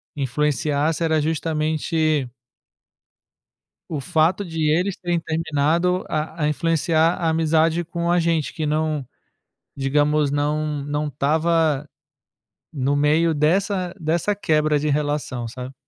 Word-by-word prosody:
influenciasse 150 +3 0
era 160 -1 +2
justamente 155 -1 0 1.6
O 155 -3 -3
fato 175 +6 +1
de 160 -2 0
eles 180 +5 +1
terem 175 -1 -1
terminado 165 +3 0
a 155 +1 -3
a - - +2
influenciar 165 +1 +1
a 170 - -1
amizade 160 +1 +2
com 170 +1 -2
a 175 - +3
gente 165 -3 0
que 160 - -3
não, 155 -2 -1 0.7
digamos, 145 +2 +1
não 150 0 -1
não 145 +1 -2
estava, 155 +1 +1 0.9
no 140 -2 0
meio 155 +3 +2
dessa 180 +4 +1
dessa 170 +6 0
quebra 155 -5 +2
de 150 +1 -1
relação, 145 -5 -1
sabe? 125 +3 -8
155 Hz, 115 wpm, -22 LUFS, 150-165 Hz, 1.6 s, a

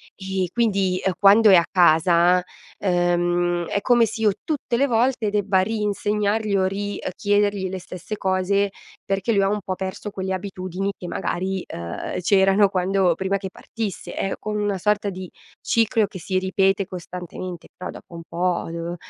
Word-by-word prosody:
E 190 -2 -2
quindi, 195 -6 +1
ehm, 190 - +1
quando 205 +2 +7
è - - +9
a 170 - +5
casa, 175 +1 +4 0.4
ehm, 175 -1 +1
è 200 - -1
come 240 0 +4
se 220 +1 -6
io 210 -2 +4
tutte 280 -6 -2
le 280 +2 +3
volte 235 -2 +1
debba 200 -2 +1
ri-insegnargli 210 0 0
o 190 - +2
ri-chiedergli 205 0 -1
le 190 0 -4
stesse 185 +4 -7
cose, 195 +1 +1 0.3
perché 195 +3 -1
lui 200 - +3
ha 195 - +2
un 210 0 0
po' 185 -1 -3
perso 190 +2 -5
quelle 190 -1 -3
abitudini 185 0 -4
che 180 - -8
magari, 190 +2 -2
uhm, 85 - -5
c'erano 195 +1 +4
quando 185 -1 +2
prima 195 +1 -1
che 190 -1 -6
partisse. 220 -3 -6
È 195 - -2
come 210 -1 -3
una 205 -2 0
sorta 210 +1 +1
di 185 -1 -7 0.3
ciclo 225 -2 +2
che 195 - -9
si 185 +3 -2
ripete 195 +1 +1
costantemente, 180 0 -7
però 180 - -6
dopo 170 - -12
un 165 - -7
po' 175 0 -1
devo 170 +1 -4
190 Hz, 165 wpm, -23 LUFS, 180-205 Hz, 0.4 s, è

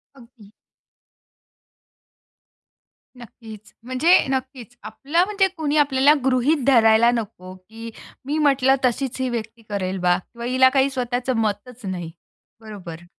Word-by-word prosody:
अगदी. 235 -5 -18 2.7
नक्कीच. 220 -3 -13
म्हणजे 255 +9 +3
नक्कीच 260 -3 -5
आपला 280 +10 -1
म्हणजे 400 -2 +1
कोणी 305 -1 -1
आपल्याला 285 0 +4
गृहीत 265 +2 +1
धरायला 230 -2 +5
नको, 200 -6 -6
की 225 +5 -11 0.4
मी 295 +3 -2
म्हटलं 270 -3 +3
तशीच 260 +1 -2
ही 255 - -1
व्यक्ती 230 -1 -6
करेल 190 -2 -3
बा 180 0 +2
किंवा 235 +5 -11
हिला 260 +1 +4
काही 270 0 +3
स्वतःचं 250 -1 -2
मतच 220 +4 -4
नाही. 175 -3 -5 0.5
बरोबर. 175 -6 -10
245 Hz, 120 wpm, -21 LUFS, 215-270 Hz, 2.7 s, धरायला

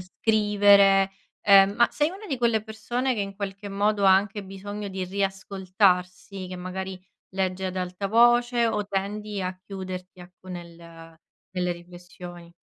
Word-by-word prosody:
scrivere, 200 -1 +4 0.3
ehm, 195 0 +7
ma 235 0 +5
sei 295 +1 +1
una 400 +3 -10
di 275 -7 -2
quelle 230 -3 +2
persone 240 +4 -2
che 210 - -2
in 195 -1 -5
qualche 200 0 -5
modo 205 +1 0
ha 190 - +8
anche 200 +1 0
bisogno 200 +2 -7
di 190 -1 -4
riascoltarsi, 190 -1 -1
che 185 - -6
magari 185 +1 -6 0.3
legge 190 0 -2
ad 185 - -5
alta 185 +2 -3
voce 240 +1 +4
o 210 -2 -1
tendi 205 +1 -3
a 185 0 -3
chiuderti 185 -2 -7
ecco, 180 +1 -15
nel 175 -2 -8 0.7
nelle 180 -1 -1
riflessioni. 175 0 -12
195 Hz, 145 wpm, -25 LUFS, 185-210 Hz, 0.7 s, ha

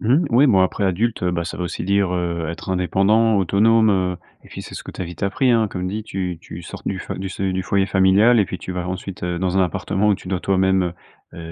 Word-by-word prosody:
Mmh 115 +3 +1
mh, 170 - +2
oui, 125 +5 +5
bon, 100 -7 +4
après, 95 +2 +1
adulte, 105 +4 0
heu, 90 - +1
bah, 85 -1 -2
ça - - -6
veut 90 - -3
aussi 85 - -5
dire 100 -1 +1
heu, 85 -2 -2
être 85 - -8
indépendant, 100 +5 +2
autonome 110 +4 +3
heu, 90 -2 0 0.3
et - - -16
puis, - - -8
c'est - - -10
ce - - -7
que - - -7
tu - - -11
as - - -1
vite 85 +2 -9
appris, 125 +6 +1
hein. 115 -2 +3
Comme 90 -1 -4
dit, 105 +3 -4
tu 90 -5 -4
tu 85 0 -10
sors - - -9
du 95 -2 -3 0.2
du 95 +1 -4
se 95 - -6
du 95 -1 -1
foyer 100 0 +1
familial 100 +6 +4
et 105 - +4
puis 90 - -6
tu 90 - -6
vas 90 0 -4
ensuite, 95 0 -6
heu, 90 -1 -2
dans 95 0 -1
un 95 - +4
appartement 95 +4 -1
où 105 - +4
tu 90 - -10
dois 95 -1 -1
toi-même 95 0 +2 0.5
heu, - - -11
95 Hz, 270 wpm, -21 LUFS, 90-105 Hz, 0.5 s, oui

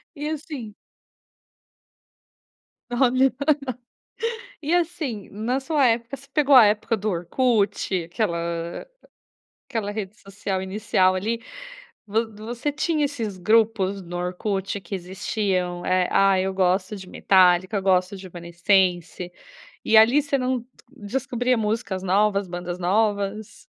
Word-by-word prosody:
E 295 +1 -4
assim 285 -8 -6 2.2
Olha! 255 +1 +3 1.3
E, 310 +3 0
assim, 320 - -2
na 225 +6 -1
sua 280 0 +2
época 235 +2 0
você 275 +1 -18
pegou 290 -2 +4
a 240 -4 +9
época 210 +2 +1
do 215 +1 -3
Orkut, 200 -1 0
aquela 175 +1 -1 0.5
a - - -16 0.8
aquela 220 -5 -2
rede 205 -1 -5
social 195 -1 -4
inicial, 190 -1 +1
ali, 225 +5 -2 0.6
vo 220 +2 -1
você 235 +6 -3
tinha 310 0 0
esses 230 -9 -3
grupos 200 0 +2
no 175 -1 -7
Orkut, 190 +3 -2
que 190 +2 -7
existiam, 185 -1 -2
eh, 185 -1 +2
"Ah, 195 -1 +4
eu 190 0 -1
gosto 185 +2 +1
de 190 -2 -10
Metallica, 185 +2 +3
gosto 185 0 +2
de 190 - -11
Evanescence.", 175 0 0 0.5
e, 220 - +4
ali, 235 +7 +6
você 280 -1 0
não 255 -1 0
d 235 - -18 0.2
descobria 250 +1 -1
músicas 210 -3 -2
novas, 200 +1 +2
bandas 175 0 -5
novas? 205 +2 -1
205 Hz, 125 wpm, -24 LUFS, 185-240 Hz, 2.2 s, a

